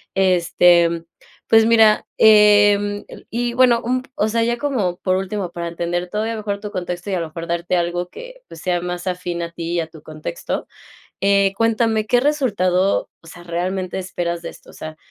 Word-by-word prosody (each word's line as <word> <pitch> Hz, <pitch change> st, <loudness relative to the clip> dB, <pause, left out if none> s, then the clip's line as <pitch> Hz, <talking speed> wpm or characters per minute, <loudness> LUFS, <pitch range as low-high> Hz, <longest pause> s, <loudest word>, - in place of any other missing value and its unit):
Este, 175 Hz, -2 st, +3 dB, 0.4 s
pues 225 Hz, 0 st, +5 dB
mira, 220 Hz, -2 st, +5 dB
em, 205 Hz, -1 st, +5 dB
eh, -, -, -12 dB
y 240 Hz, +1 st, -2 dB
bueno, 245 Hz, -2 st, +4 dB
un 255 Hz, +2 st, 0 dB
p -, -, -21 dB
o 295 Hz, -, +1 dB
sea, 230 Hz, +1 st, +1 dB
ya 235 Hz, +1 st, 0 dB
como 230 Hz, -11 st, -1 dB
por 185 Hz, 0 st, 0 dB
último, 195 Hz, -1 st, -3 dB
para 170 Hz, 0 st, -5 dB
entender 175 Hz, +1 st, -3 dB
todavía 220 Hz, +4 st, -2 dB
mejor 205 Hz, -1 st, -3 dB
tu 210 Hz, 0 st, -6 dB
contexto 180 Hz, +1 st, -5 dB
y -, -, -1 dB
a 175 Hz, -, -1 dB
lo 165 Hz, -, -4 dB
mejor 165 Hz, +1 st, -8 dB
darte 170 Hz, +1 st, -1 dB
algo 175 Hz, +1 st, -2 dB
que, -, -, -12 dB
pues, -, -, -11 dB
sea 175 Hz, -2 st, -1 dB
más 180 Hz, +1 st, -5 dB
afín 180 Hz, -1 st, -3 dB
a 170 Hz, -, -6 dB
ti 170 Hz, 0 st, -5 dB
y 175 Hz, -, +1 dB
a 160 Hz, -, -5 dB
tu 160 Hz, -1 st, -15 dB
contexto, 155 Hz, -, -5 dB, 0.5 s
eh, 200 Hz, 0 st, +3 dB
cuéntame, 225 Hz, -1 st, +1 dB
¿qué 245 Hz, +3 st, +3 dB
resultado, 200 Hz, -10 st, +1 dB
o -, -, -18 dB
sea, 175 Hz, +1 st, -12 dB
realmente 180 Hz, +2 st, -3 dB
esperas 175 Hz, -2 st, -4 dB
de -, -, -6 dB
esto? -, -, -16 dB
O -, -, -16 dB
sea, 155 Hz, 0 st, -8 dB
190 Hz, 200 wpm, -20 LUFS, 175-220 Hz, 0.5 s, pues